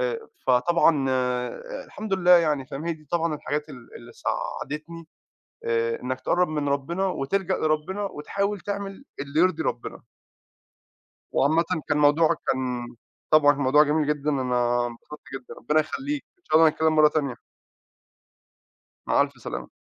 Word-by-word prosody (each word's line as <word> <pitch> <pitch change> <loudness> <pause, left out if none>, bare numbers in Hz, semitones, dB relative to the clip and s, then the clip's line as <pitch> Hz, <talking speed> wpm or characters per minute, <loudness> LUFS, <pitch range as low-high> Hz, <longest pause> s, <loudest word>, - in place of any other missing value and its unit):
آآ - - -1 0.3
فطبعًا 140 +2 +3 0.8
الحمد 210 -2 -4
لله 180 -1 +2
يعني 155 -6 +5
فاهم، 140 +3 -6
هي 170 - +1
دي 155 -1 -12
طبعًا 165 -2 +1
الحاجات 150 +1 -3
ال 125 -5 -12
اللي 120 0 -13
ساعدتني 160 +2 -5 0.6
آآ 115 0 0
إنّك 130 +1 -3
تقرّب 180 +7 +2
من 150 -2 -2
ربِّنا 170 +8 -1
وتلجَأ 185 +3 -1
لربِّنا 155 +6 -1
وتحاول 200 +3 -2
تعمل 200 +4 -5
اللي 140 +2 -2
يرضي 170 -2 +3
ربِّنا. 120 - -4 1.3
وعامةً 160 +5 +3 0.2
كان 150 - +2
موضوعك 150 +2 +4 0.2
كان 125 -2 -3 0.4
طبعًا 150 -2 +6
موضوع 140 +1 +4
جميل 150 0 +1
جدًا، 150 0 0
أنا 125 -3 +1
انبسطت 120 +5 -10
جدًا، 130 -2 -8
ربِّنا 150 +5 +1
يخلّيك، 280 - -4
إن 365 - -41
شاء 155 - +2
الله 165 0 +7
نتكلّم 160 +1 +1
مرّة 155 0 +7
تانية. 145 -5 -1 1.7
مع - - +3
ألْف - - -4
سلامة. - - -5
150 Hz, 140 wpm, -25 LUFS, 135-170 Hz, 1.7 s, الله